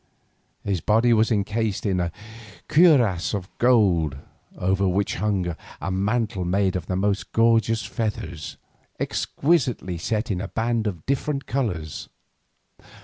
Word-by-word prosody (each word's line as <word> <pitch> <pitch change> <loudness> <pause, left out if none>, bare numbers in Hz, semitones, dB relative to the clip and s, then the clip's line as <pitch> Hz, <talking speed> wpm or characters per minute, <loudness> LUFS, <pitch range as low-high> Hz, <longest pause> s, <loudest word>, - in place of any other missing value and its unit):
His 95 -4 -1
body 115 +3 +3
was 110 0 +3
encased 110 0 -1
in 95 -3 +1
a 85 -1 -1 0.6
cuirass 120 - +4
of 95 -1 -7
gold, 95 - +3 0.4
over 95 +1 +1
which 95 +2 0
hung 95 -3 -1 0.2
a 95 - -3
mantle 100 0 0
made 95 +1 +1
of 90 -3 -3
the 90 - -1
most 100 +1 -1
gorgeous 115 -1 +3
feathers, 100 -6 -4 0.4
exquisitely 125 - 0
set 110 +6 -1
in 90 -1 -2
bands 115 -1 0
of 90 -6 -5
different 140 +1 -1
colours. 90 - -3
105 Hz, 125 wpm, -24 LUFS, 90-115 Hz, 0.6 s, cuirass